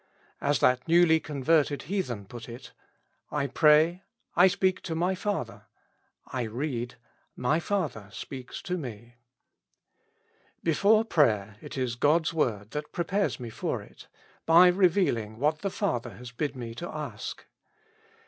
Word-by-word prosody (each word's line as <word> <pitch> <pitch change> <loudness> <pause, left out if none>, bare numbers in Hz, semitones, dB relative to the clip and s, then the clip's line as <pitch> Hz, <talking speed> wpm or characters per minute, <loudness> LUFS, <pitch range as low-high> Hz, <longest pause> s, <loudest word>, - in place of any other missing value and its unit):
As 145 +1 +2
that 125 +3 +3
newly 165 -1 +5
converted 150 0 +1
heathen 140 - -3
put 115 +3 -10
it: 120 +2 -10 0.6
I 145 -2 -1
pray 155 +5 +4 0.2
— - - -44
I 180 +2 +7
speak 185 -1 +1
to 165 - -4
my 175 +3 +1
father; 190 - -4 0.6
I 130 - -4
read 120 0 -3 0.2
— - - -42
my 155 +5 +3
Father 155 - -2
speaks 130 +4 -8
to 180 -1 -2
me. 120 -3 -9 1.5
Before 205 +7 +4
prayer, 110 - +2
it - - -8
is 125 -2 -1
God's 155 +6 +2
word 110 -9 -1
that 150 0 -5
prepares 190 +2 -1
me 120 -2 -6
for - - -3
it, - - -16 0.4
by 170 +2 +8
revealing 175 - +2
what 150 +4 +1
the 195 - -2
Father 120 -9 -2
has 125 -1 -10
bid 140 +4 -3
me 120 -3 -6
ask. 150 -10 -6
150 Hz, 140 wpm, -28 LUFS, 120-175 Hz, 1.5 s, by